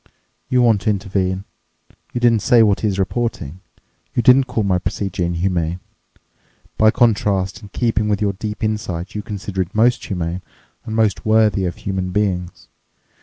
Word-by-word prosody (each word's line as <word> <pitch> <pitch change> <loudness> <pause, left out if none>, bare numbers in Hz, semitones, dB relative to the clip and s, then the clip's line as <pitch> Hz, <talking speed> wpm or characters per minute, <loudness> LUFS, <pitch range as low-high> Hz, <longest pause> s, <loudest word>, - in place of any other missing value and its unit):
You 125 -1 +3
want 110 -4 +3
to 100 - 0
intervene—you 95 +3 -4
didn't 120 -2 +4
say 115 +2 +5
what 105 -3 +2
he 110 - 0
is 100 -2 -1
reporting—you 95 - -4
didn't 130 +3 +6
call 125 -3 -1
my 95 -2 +1
procedure 95 0 -3
inhuman; 85 0 -1 1.0
by 110 - +5
contrast, 100 -5 +1
in 105 - -12
keeping 110 -1 0
with 100 -1 +1
your 100 -2 0
deep 105 +3 -6
insight, 105 -5 -3
you 105 - -3
consider 100 -3 -4
it 90 +2 -5
most 120 +2 +3
humane 90 -1 -3 0.4
and 110 -2 -4
most 110 -3 +1
worthy 110 -3 +3
of 85 - -3
human 95 -2 -3
beings. 90 -2 -2
100 Hz, 155 wpm, -19 LUFS, 95-110 Hz, 1.0 s, didn't